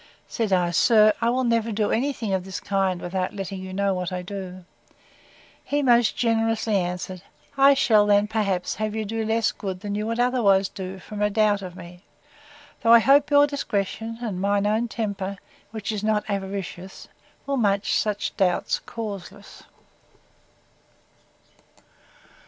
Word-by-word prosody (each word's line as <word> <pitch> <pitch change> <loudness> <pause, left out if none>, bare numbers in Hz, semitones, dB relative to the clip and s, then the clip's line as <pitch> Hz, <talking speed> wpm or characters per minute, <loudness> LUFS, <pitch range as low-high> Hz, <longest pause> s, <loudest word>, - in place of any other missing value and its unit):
Said 225 -3 -2
I, 180 -2 +2
Sir, 215 +4 +5
I 230 - +2
will 255 +2 +1
never 230 -1 +1
do 210 0 0
any 270 +6 +1
thing 220 -7 -4
of 190 -1 0
this 190 0 -6
kind 195 -2 -1
without 185 +2 -3
letting 195 -1 -5
you 190 0 -7
know 200 +1 0
what 180 0 -3
I 180 0 -4
do. 185 -1 -7 1.0
He 290 0 -1
most 240 -4 +3
generously 225 -2 +1
answered, 180 0 -4 0.3
I 275 0 +6
shall 215 -6 +4
then, 205 0 +4
perhaps, 200 -5 -1
have 215 0 -2
you 220 -1 -2
do 225 +2 -3
less 220 0 +1
good 190 -2 -6
than 205 -1 -4
you 210 +1 -2
would 230 +1 -2
otherwise 215 -6 +3
do, 190 -1 -7
from 210 +2 -8
a 210 - +3
doubt 210 -1 +2
of 180 -2 -8
me; 175 0 -12 0.8
though, 230 0 +5
I - - +10
hope, 275 +5 +4
your 290 0 +6
discretion, 225 -5 -3
and 195 -6 -3
my 200 +1 +2
own 215 +4 +1
temper, 200 -4 -4 0.3
which 215 -1 -5
is 210 -1 -4
not 215 -1 0
avaricious, 195 -2 -5 0.4
will 280 0 -1
make 200 -4 +1
such 210 -1 -1
doubt 180 -2 +1
causeless. 205 -2 -8
205 Hz, 160 wpm, -24 LUFS, 190-225 Hz, 1.0 s, I